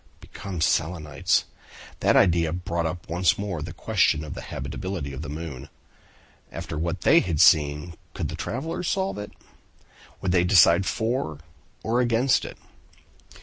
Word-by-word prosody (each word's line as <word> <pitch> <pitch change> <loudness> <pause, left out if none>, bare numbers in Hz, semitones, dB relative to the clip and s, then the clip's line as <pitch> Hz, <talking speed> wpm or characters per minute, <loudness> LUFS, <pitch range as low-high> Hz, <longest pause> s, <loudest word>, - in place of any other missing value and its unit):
Become 95 -4 -7
Selenites! 80 -2 +1 0.5
That - - +3
idea 85 -3 +4
brought 85 -1 -2
up 85 +2 -6
once 90 +3 +2
more 100 -6 -4
the 80 +1 -6
question 85 -3 +1
of 75 - -6
the - - -7
habitability 90 -7 -5
of 70 - -6
the 75 - -6
moon. 75 -3 -7 0.8
After - - -6
what 85 +2 -2
they - - +6
had 85 -5 -2
seen, 75 +1 +4 0.2
could - - -2
the - - -6
travelers 160 +7 -4
solve 190 - -1
it? 105 - -7 0.9
Would 95 - -1
they 90 -1 +3
decide 90 0 +5
for 110 - -1 0.5
or 115 +2 +1
against 120 +2 +2
it? - - -9
85 Hz, 145 wpm, -25 LUFS, 80-100 Hz, 0.9 s, they